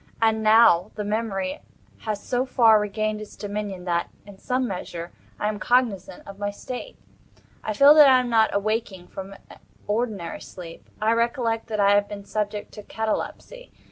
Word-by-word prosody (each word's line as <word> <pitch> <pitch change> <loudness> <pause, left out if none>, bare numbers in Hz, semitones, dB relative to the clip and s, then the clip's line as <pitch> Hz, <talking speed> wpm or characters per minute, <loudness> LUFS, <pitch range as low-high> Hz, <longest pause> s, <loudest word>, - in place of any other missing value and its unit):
And 220 -1 +2
now 215 -4 +5
the 210 - -3
memory 205 -3 -2 0.4
has 210 -2 -4
so 250 0 0
far 230 -4 +5
regained 215 +1 -2
its 215 - -10
dominion, 205 -3 -5
that, 170 -1 -1 0.2
in 200 -2 -14
some 255 0 -1
measure, 175 -3 -6 0.3
I 210 - 0
am 210 -1 -3
cognizant 220 -8 0
of 200 0 -10
my 205 0 -1
state. 250 - -8 0.7
I 215 - -2
feel 280 +7 +7
that 300 -2 +8
I 260 -1 +6
am 250 - -2
not 225 -2 +3
awaking 200 -3 -2
from 195 +1 -8 0.5
ordinary 210 -5 -3
sleep. 170 -3 -11
I 215 +1 +2
recollect 230 -1 0
that 215 -2 -3
I 200 0 +5
have 205 0 +3
been 200 -1 -8
subject 210 0 -3
to 210 - -10
catalepsy. 220 - -5
215 Hz, 170 wpm, -24 LUFS, 200-230 Hz, 0.7 s, that